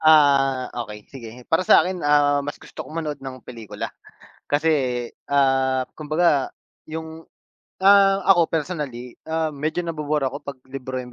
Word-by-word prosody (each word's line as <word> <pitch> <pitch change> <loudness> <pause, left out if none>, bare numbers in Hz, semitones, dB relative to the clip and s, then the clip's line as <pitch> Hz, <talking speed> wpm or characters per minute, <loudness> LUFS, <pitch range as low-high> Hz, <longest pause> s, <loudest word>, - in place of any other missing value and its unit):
Ah, 140 -4 +4
okey 110 -3 -6
sige. 120 -4 -9 0.2
Para 165 +3 +3
sa - - +7
'kin, 185 -1 -3
ah, 145 -1 +3
mas 145 +1 -5
gusto - - -12
kong 160 - -9
manood 150 -2 -4
ng 130 -2 -8
pelikula. 115 -4 -7 0.6
Kasi, 140 -5 +1 0.2
ah, 135 -2 +2
kumbaga 155 -2 +1 0.4
'yong, 160 0 -7 0.6
ah, 195 0 +6
ako 175 -4 +5
personally, 145 -7 -4
ah, 160 -1 -1
medyo 155 +5 -2
nabu-bore 150 -3 -1
ako 130 - -3
'pag 140 -2 -7
libro 130 -1 -5
'yong 125 -1 -8
145 Hz, 145 wpm, -23 LUFS, 130-160 Hz, 0.6 s, sa